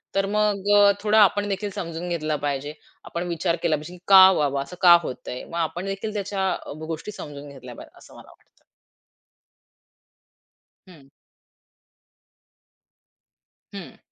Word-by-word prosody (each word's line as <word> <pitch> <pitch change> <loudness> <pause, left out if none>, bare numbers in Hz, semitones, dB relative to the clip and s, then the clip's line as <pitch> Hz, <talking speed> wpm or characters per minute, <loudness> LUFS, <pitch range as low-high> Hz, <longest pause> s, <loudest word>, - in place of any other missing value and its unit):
तर 195 0 +1
मग 205 -1 -1
अ, 205 0 +6
थोडं 215 +1 +2
आपण 205 0 +4
देखील 200 +1 -3
समजून 170 +1 -5
घेतलं 155 -3 -2
पाहिजे. 145 +1 -3 0.3
आपण 175 +1 -5
विचार 170 0 -1
केला 160 -2 +2
पाहिजे, 155 +4 -9
की 180 - -13
का 190 -1 +9
बाबा 140 -3 0
असं 180 - -9
का 175 -1 +8
होतंय? 125 -1 -7
मग 170 - -8
आपण 175 +3 -3
देखील 195 +2 -5
त्याच्या 195 -2 -2 0.4
गोष्टी 165 +6 -6
समजून 145 -6 -10
घेतल्या 125 -3 -11
पाहिजे - - -14
असं - - -17
मला - - -15
वाटतं. - - -27 2.3
हं. 150 -7 -17 2.7
हं. - - -10
175 Hz, 135 wpm, -23 LUFS, 155-195 Hz, 2.7 s, का